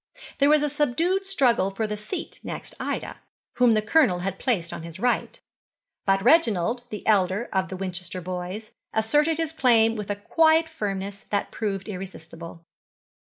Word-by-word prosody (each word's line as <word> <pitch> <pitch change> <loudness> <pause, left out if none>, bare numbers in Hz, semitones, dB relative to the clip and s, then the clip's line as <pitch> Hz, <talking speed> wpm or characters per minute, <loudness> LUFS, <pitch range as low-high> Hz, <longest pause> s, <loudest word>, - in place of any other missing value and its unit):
There 280 +1 +5
was 300 0 +5
a - - +2
subdued 330 +8 0
struggle 250 - +2
for 195 +3 -2
the 210 0 -3
seat 210 - -6
next - - -6
Ida, - - -4 0.4
whom 245 -3 +5
the 215 - +1
Colonel 215 - +3
had 190 +1 -3
placed 185 -10 -1
on - - -6
his 165 +1 -9
right, 245 +3 0 0.7
but 195 0 +3
Reginald, 240 - +3
the 210 - -7
elder 200 +1 +2
of 190 -1 0
the 190 - -5
Winchester 185 -1 -4
boys, 185 +4 -5 0.2
asserted 295 +9 +2
his 325 -1 -2
claim 230 -6 +4
with 210 -2 -5
a 205 - 0
quiet 320 +9 +3
firmness 200 -8 -4
that 200 - -1
proved 200 -3 -3
irresistible. 170 -4 -8
210 Hz, 165 wpm, -25 LUFS, 190-270 Hz, 0.7 s, There